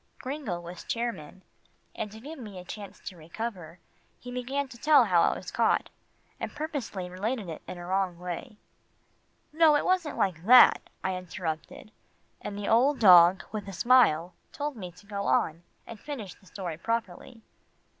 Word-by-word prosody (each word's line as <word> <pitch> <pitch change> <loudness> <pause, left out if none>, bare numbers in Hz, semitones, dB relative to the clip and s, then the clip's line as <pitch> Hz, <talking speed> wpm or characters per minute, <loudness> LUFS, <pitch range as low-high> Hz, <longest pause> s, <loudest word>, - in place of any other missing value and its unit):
Gringo 260 - -4
was 175 0 -9
chairman, 190 -7 -4 0.5
and 210 -2 -5
to 220 - -11
give 295 +6 -9
me 210 -6 -9
a 180 - -8
chance 200 +1 -9
to 185 - -8
recover, 175 0 -7 0.4
he 245 - -9
began 265 +3 -2
to 235 - -11
tell 300 -2 +6
how 180 -6 +3
I - - +3
was - - -8
caught, - - +1 0.5
and - - -4
purposely 285 - -4
related 200 +3 -3
it 160 - -7
in 180 - -7
a 175 - -8
wrong 185 -1 -1
way. 180 +6 -6 1.0
"No, 315 -1 +5
it 295 - +1
wasn't 365 -5 0
like 175 -4 0
that," 250 +1 +8 0.2
I 190 0 -1
interrupted, 175 +1 -6 0.5
and 205 -1 -6
the 205 - -4
old 260 +6 +4
dog, 180 -3 +7
with 210 -2 -5
a 195 - -7
smile, 180 -7 +4 0.2
told 290 -1 -4
me 185 -5 -7
to 180 +3 -19
go 200 -1 -4
on, 155 +5 +1 0.2
and 230 -2 -10
finish 225 -11 -7
the 190 - -23
story 175 -5 -6
properly. 225 +2 -4
200 Hz, 170 wpm, -28 LUFS, 180-250 Hz, 1.0 s, that